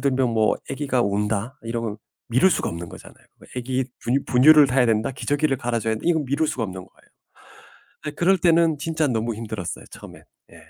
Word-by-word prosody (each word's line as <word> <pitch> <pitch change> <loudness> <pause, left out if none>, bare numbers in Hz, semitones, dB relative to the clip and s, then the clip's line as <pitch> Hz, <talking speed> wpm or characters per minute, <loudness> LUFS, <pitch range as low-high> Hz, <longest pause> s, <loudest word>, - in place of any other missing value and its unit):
들면 130 -3 +1
뭐 110 -2 +2
애기가 135 -3 0
운다 105 +5 -2
이러면 115 -2 -4 0.3
미룰 130 +11 +4
수가 - - 0
없는 85 0 -7
거잖아요. - - -14 0.3
애기 130 +1 -1 0.2
분유 135 +4 0
분유를 145 +4 +6
타야 125 -1 +2
된다, 115 +3 +1
기저귀를 145 +1 0
갈아줘야 115 -2 -1
된다 110 - -8
이건 160 -3 +2
미룰 140 +4 0
수가 120 - -2
없는 95 -2 -6
거예요. 95 - -26 1.0
네. - - -1
그럴 180 +5 +2
때는 165 -2 +3
진짜 160 +1 -1
너무 115 -1 -1
힘들었어요, 110 -5 -6
처음엔. - - -12 0.3
예. - - -14
125 Hz, 400 characters per minute, -23 LUFS, 110-145 Hz, 1.0 s, 분유를